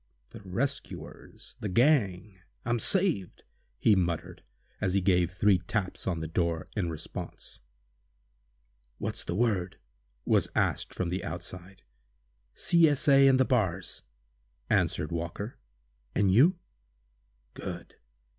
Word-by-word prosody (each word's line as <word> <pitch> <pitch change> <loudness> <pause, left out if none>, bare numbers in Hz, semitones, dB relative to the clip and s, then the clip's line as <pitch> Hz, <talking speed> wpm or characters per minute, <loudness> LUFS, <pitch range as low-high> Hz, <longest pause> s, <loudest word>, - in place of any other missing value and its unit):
"The - - -10
rescuers—the 105 0 -5
gang—I'm 105 -2 0
saved!" 175 - +1 0.3
he 105 - +4
muttered, 85 -4 -2 0.4
as 95 0 +1
he - - +4
gave 90 -2 +2
three 95 +1 +3
taps 95 +2 -3
on 85 -3 -1
the 80 - -3
door, 85 -1 -1
in 95 -6 -1
response. 80 -2 -7 1.4
"What's - - -4
the 85 - -3
word?" 100 -5 0 0.5
was - - +3
asked - - 0
from 90 - -2
the 90 +1 -3
outside. 90 +3 -7 0.7
"C. 170 -2 +5
S. 145 0 -1
A. 135 -1 +7
and 130 -1 +5
the 130 - +4
Bars!" 95 - 0 0.7
answered 75 - +1
Walker. 85 +7 -5 0.6
"And 100 -2 +3
you?" 160 - +5 1.0
"Good! - - -7
95 Hz, 115 wpm, -29 LUFS, 90-120 Hz, 1.4 s, A